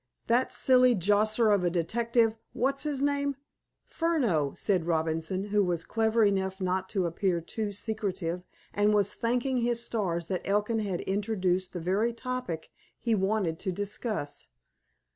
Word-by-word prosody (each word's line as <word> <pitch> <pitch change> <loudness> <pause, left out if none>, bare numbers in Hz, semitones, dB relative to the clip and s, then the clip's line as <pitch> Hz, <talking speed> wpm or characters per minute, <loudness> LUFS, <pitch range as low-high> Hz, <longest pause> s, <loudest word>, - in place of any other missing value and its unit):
That 240 +3 +2
silly 255 -1 +4
josser 210 +4 +3
of 200 -3 +3
a 175 - +3
detective—What's 230 +8 0
his 285 -2 -1
name?" 285 0 +1 0.5
"Furneaux," 240 - 0
said 185 -5 +1
Robinson, 165 +4 -1
who 205 0 +3
was 175 -3 -1
clever 225 0 +2
enough 190 -1 +1
not 185 0 -1
to 190 -4 0
appear 175 +1 0
too 205 +5 -4
secretive, 195 -5 -3 0.3
and 210 +1 +3
was 205 0 +2
thanking 250 +3 0
his 235 0 0
stars 175 -8 -2
that 185 +1 -2
Elkin 210 +3 +1
had 195 -5 -2
introduced 190 -2 -1
the 180 - -3
very 200 +7 +1
topic 250 -9 -4 0.3
he 230 - 0
wanted 190 -4 0
to 190 - -2
discuss. 205 -3 -4
205 Hz, 145 wpm, -29 LUFS, 180-230 Hz, 0.5 s, silly